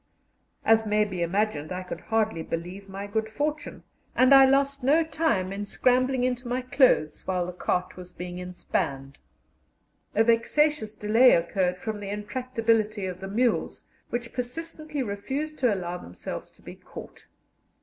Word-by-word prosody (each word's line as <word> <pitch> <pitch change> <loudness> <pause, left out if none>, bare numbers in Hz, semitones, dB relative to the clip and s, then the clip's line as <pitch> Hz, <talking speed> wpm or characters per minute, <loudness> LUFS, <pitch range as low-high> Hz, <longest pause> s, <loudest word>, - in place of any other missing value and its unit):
As 225 0 +5
may 210 0 +3
be 190 -4 -5
imagined, 170 -3 -1
I 185 0 -3
could 180 - -7
hardly 220 -6 0
believe 180 +5 -6
my 195 +1 -6
good 220 +2 -2
fortune, 295 +5 -3 0.3
and 255 +2 +6
I 270 0 +9
lost 275 0 +2
no 300 +5 +4
time 305 - 0
in 200 +1 -4
scrambling 255 +4 +2
into 250 0 -1
my 250 +1 -1
clothes 255 - +2
while 180 -2 0
the 180 - -6
cart 180 +1 -2
was 180 0 -9
being 180 0 -7
inspanned. 140 -6 -3 1.0
A 220 - +5
vexatious 235 +1 +2
delay 225 +5 +5
occurred 180 +1 +1
from 215 +3 -4
the 200 -1 -6
intractability 220 -1 -1
of 185 -1 -5
the 195 - -6
mules, 235 +5 0 0.2
which 240 -1 -4
persistently 305 +3 -4
refused 270 +9 -4
to 250 -4 +3
allow 180 -3 -3
themselves 90 - -7
to - - -26
be - - -9
caught. - - -12
220 Hz, 155 wpm, -26 LUFS, 185-255 Hz, 1.0 s, I